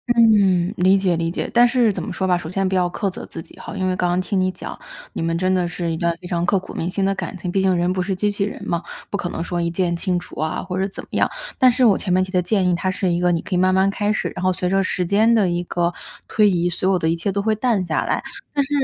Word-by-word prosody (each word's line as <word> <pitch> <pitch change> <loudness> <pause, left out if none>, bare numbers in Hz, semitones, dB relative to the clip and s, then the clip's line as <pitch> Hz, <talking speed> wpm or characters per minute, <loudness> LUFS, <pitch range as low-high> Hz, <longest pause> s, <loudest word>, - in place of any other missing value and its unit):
嗯， 200 -5 +4
理 185 +2 +4
解 185 -3 +1
理 165 0 -1
解。 170 - -4
但 240 0 +6
是 240 -2 +3
怎 - - -4
么 - - -5
说 190 - -2
吧， 180 -1 +3
首 160 -2 -6
先 195 +2 0
不 - - -3
要 180 -1 +2
苛 195 +3 -2
责 185 - -8
自 165 - -8
己 - - -17
哈， - - -8
因 190 -2 -1
为 - - +1
刚 180 - +1
刚 175 +1 +1
听 195 +1 -1
你 185 0 +2
讲， - - -8 0.3
你 - - -5
们 165 0 0
真 185 +2 +1
的 180 -2 +1
是 170 -1 -3
一 160 - -2
段 170 0 0
非 - - -11
常 175 -1 0
刻 195 +3 +3
骨 - - -11
铭 170 - -2
心 195 +1 -1
的 195 +1 +2
感 190 - -5
情， 175 0 -4
毕 190 +1 +1
竟 190 -1 +3
人 175 +1 +1
不 185 0 -1
是 190 +1 -1
机 205 +3 0
器 200 -1 -1
人 205 - -6
嘛， 170 -1 -1 0.3
不 200 - -2
可 180 - -3
能 165 - -4
说 175 -1 -2
一 170 - 0
键 175 0 0
清 180 0 0
除 175 - -8
啊， 155 0 -2
或 185 0 -4
者 195 - +1
怎 195 - -8
么 - - -17
样。 - - +2 0.3
但 260 -2 +7
是 250 +1 +1
我 215 -5 +5
前 180 - -1
面 185 +1 +3
提 185 - -7
的 180 -1 +2
建 185 0 +1
议， 180 - +2
它 180 +2 -1
是 185 -1 0
一 170 - 0
个 180 0 +2
你 165 - 0
可 - - -6
以 - - +2
慢 185 +1 +3
慢 190 +1 +3
开 205 +1 0
始， - - -2
然 - - -6
后 185 - +3
随 180 0 -2
着 195 +1 +2
时 185 -1 -1
间 220 +6 +3
的 200 -5 +3
一 175 0 -1
个 175 0 -1 0.4
推 210 -1 +4
移， 175 -1 +1
所 185 +2 -1
有 190 - +3
的 160 -2 0
一 165 - +1
切 170 +4 -2
都 200 - 0
会 220 +2 +1
淡 215 -4 0
下 160 - -1
来。 - - -1 0.3
但 285 -1 +2
是， 270 - -9
185 Hz, 345 characters per minute, -21 LUFS, 175-200 Hz, 0.4 s, 但